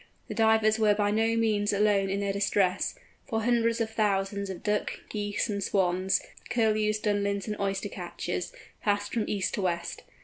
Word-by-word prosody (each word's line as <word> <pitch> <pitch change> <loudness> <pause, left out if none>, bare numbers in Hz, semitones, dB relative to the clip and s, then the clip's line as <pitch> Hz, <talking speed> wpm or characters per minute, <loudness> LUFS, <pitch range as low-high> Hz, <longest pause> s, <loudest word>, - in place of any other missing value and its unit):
The - - -3
Divers 220 0 +3
were 210 -1 +4
by 205 0 +1
no 225 +2 +2
means 210 -2 +2
alone 200 -1 +2
in 200 +1 -1
their 200 -1 0
distress, 200 -1 +1 0.3
for 225 -3 -1
hundreds 230 -1 +2
of 225 -1 -1
thousands 200 -2 0
of 190 - -7
Ducks, 210 0 0
Geese, 205 0 -1
and 200 -2 -2
Swans, 185 -1 +1 0.3
Curlews, 215 -2 +2
Dunlins, 200 -2 0
and 215 - -3
Oyster 195 0 -1
catchers, 180 -1 -4 0.3
passed 205 0 0
from 225 -3 0
east 200 -2 -1
to - - -1
west. 170 -2 -2
205 Hz, 170 wpm, -28 LUFS, 195-215 Hz, 0.3 s, were